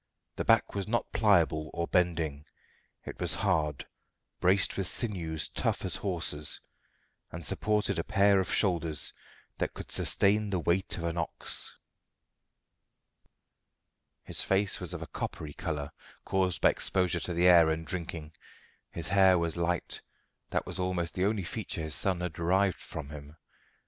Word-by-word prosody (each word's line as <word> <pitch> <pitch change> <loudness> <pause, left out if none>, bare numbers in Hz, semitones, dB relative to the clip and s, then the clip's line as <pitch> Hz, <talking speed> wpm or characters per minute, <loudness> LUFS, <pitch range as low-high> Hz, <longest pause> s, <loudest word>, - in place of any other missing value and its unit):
The - - -2
back 115 -1 +3
was 100 -1 -3
not 120 +2 -1
pliable 85 -8 +3
or 85 0 -1
bending; 80 -5 0 0.6
it - - -8
was 85 -3 +2
hard, 80 - 0 0.5
braced 95 +2 +3
with 95 -2 -2
sinews 85 -9 -1
tough - - -1
as - - 0
hawsers, 80 -6 0 0.7
and 80 -1 -6
supported 105 0 +1
a - - 0
pair 100 +2 +4
of 95 - -1
shoulders 85 -6 +1 0.5
that - - -2
could - - -8
sustain 105 +1 +3
the 95 - 0
weight 85 +4 0
of 85 - -5
an 85 0 -2
ox. 85 - -2 2.5
His - - -2
face 95 0 +1
was - - -3
of - - -5
a - - -9
coppery 75 -2 -5
colour, 75 -4 -4 0.3
caused 95 -2 +1
by - - +6
exposure 90 -2 0
to 90 - -3
the 85 +1 +2
air 85 -3 +7
and 80 +1 -2
drinking. 80 -1 -5 0.6
His 85 0 -6
hair 95 -1 +5
was 85 -1 -1
light: 85 0 -1 0.5
that - - -1
was - - -5
almost 90 -3 -1
the 95 - 0
only 105 -1 0
feature 90 -2 -4
his 80 -1 -3
son 95 0 +1
had 90 -2 -3
derived 95 +3 +1
from 75 -3 -7
him. 75 +1 -10
85 Hz, 155 wpm, -30 LUFS, 80-95 Hz, 2.5 s, air